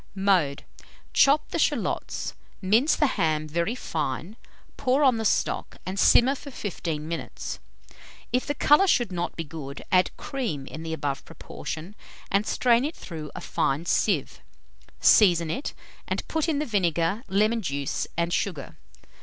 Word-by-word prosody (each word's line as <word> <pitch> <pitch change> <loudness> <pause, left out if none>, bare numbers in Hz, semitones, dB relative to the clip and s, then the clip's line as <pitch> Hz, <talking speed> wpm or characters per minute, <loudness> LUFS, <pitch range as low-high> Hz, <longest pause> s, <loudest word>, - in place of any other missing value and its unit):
Mode. 185 -8 +2 0.5
Chop 285 +2 +4
the - - -2
shalots, - - -1 0.3
mince 225 +10 +3
the 300 - +3
ham 155 - 0
very 170 +9 -1
fine, 160 - -3 0.4
pour 260 +3 +2
on 255 -4 +5
the 225 - -3
stock, - - 0
and 190 +2 -3
simmer 260 +3 +6
for 280 +1 -9
15 165 - -4
minutes. 165 0 -5 0.7
If 250 - +1
the 290 - -1
colour 300 +8 +5
should 240 - +2
not 175 -1 -3
be 165 - -3
good, 145 -3 -8
add 185 -1 +4
cream 230 - -3
in 155 - -8
the 165 0 -5
above 140 -3 -3
proportion, 165 +3 -7 0.4
and 200 +2 +2
strain 240 -1 +3
it 305 +3 -3
through 155 -3 -7
a - - -6
fine 140 +5 -1
sieve; 175 -4 0 0.6
season 170 -6 +5
it, 270 - -4 0.3
and - - -3
put 320 +1 0
in 305 - +1
the 300 - -1
vinegar, 180 - 0
lemon 215 +4 +2
juice, 140 -6 -2
and 170 0 0
sugar. 165 -9 -2
185 Hz, 155 wpm, -26 LUFS, 160-240 Hz, 0.7 s, simmer